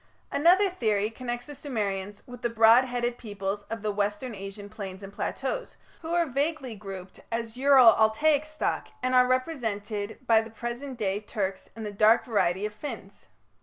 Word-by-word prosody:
Another 360 +7 +5
theory 220 - 0
connects 240 +1 -5
the 295 - -9
Sumerians 205 -8 -4
with 245 -1 -11
the 240 - 0
broad 230 +2 +6
headed 245 -1 -2
peoples 205 -2 -4
of 225 -1 -5
the 210 - 0
Western 205 +4 -2
Asian 200 +1 -8
plains 200 -2 -8
and 195 0 -9
plateaus, - - -3 0.3
who 325 0 -6
are 345 -1 +3
vaguely 280 -2 -2
grouped 195 -2 -9
as 230 0 -3
Ural 260 -3 +7
Altaic 280 +8 +3
stock 310 0 -2 0.2
and 255 0 +1
are 250 0 +6
represented 220 -6 -2
by 225 -2 +5
the 225 - -9
present 240 +4 -6
day 200 -2 -1
Turks 200 -3 -4
and 225 -1 -6
the 205 - -5
dark 215 +3 +5
variety 200 -5 +1
of 210 - -4
Finns. 285 +8 -8
225 Hz, 170 wpm, -27 LUFS, 205-255 Hz, 0.3 s, Ural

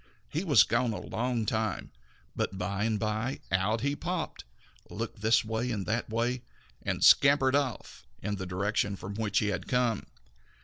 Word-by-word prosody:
He 160 +5 -2
was 155 -7 +6
gone 120 -3 +1
a - - -4
long 120 -1 -2
time, 110 -1 -2 0.4
but 95 - -2
by 100 +3 -1
and 110 -2 0
by 110 +6 -2
out 95 +5 +1
he 140 +1 0
popped, 175 +2 -4 0.4
looked - - -5
this 110 +1 +3
way 110 +3 -2
and 105 -5 -2
that 115 +2 -1
way, 120 +3 0 0.4
and - - -1
then - - -11
scampered 140 -2 +6
off 140 - -2
in 105 +1 -3
the 95 -1 -5
direction 100 +2 0
from 95 +1 -7
which 105 -1 -1
he 105 - +2
had 95 -4 -3
come. 125 -4 +1
110 Hz, 175 wpm, -29 LUFS, 105-125 Hz, 0.4 s, was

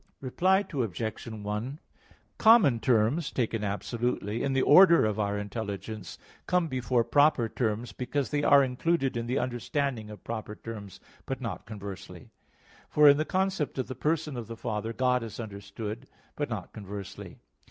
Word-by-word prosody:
Reply 185 +9 +2
Obj. 110 - -3
1: 110 +5 -4 0.6
Common 220 - +6
terms 125 +7 +2
taken 115 -3 -1
absolutely, 110 +1 -2
in 140 - 0
the 135 - +2
order 170 - +7
of 110 -1 -1
our 100 -1 0
intelligence, 105 -1 -5 0.3
come 180 -2 +2
before 125 -3 +1
proper 145 -3 +3
terms; 110 0 -2
because 130 +5 -3
they 145 -1 +1
are 140 -1 +6
included 135 +2 0
in 115 0 -3
the 125 +3 0
understanding 125 -1 -2
of 105 - -11
proper 110 -2 -5
terms; 105 -5 -9 0.3
but - - -3
not - - -5
conversely. 100 -4 -9 0.6
For 150 0 +6
in 140 0 +8
the 155 - 0
concept 190 -6 -1
of 130 - -1
the 130 - -6
person 155 0 -1
of 120 - -5
the 115 0 -7
Father, 110 +1 -3
God 125 +1 +1
is 115 0 -7
understood; 105 +1 -6 0.3
but - - -2
not - - -5
conversely. 100 -1 -8
115 Hz, 155 wpm, -28 LUFS, 105-140 Hz, 0.6 s, in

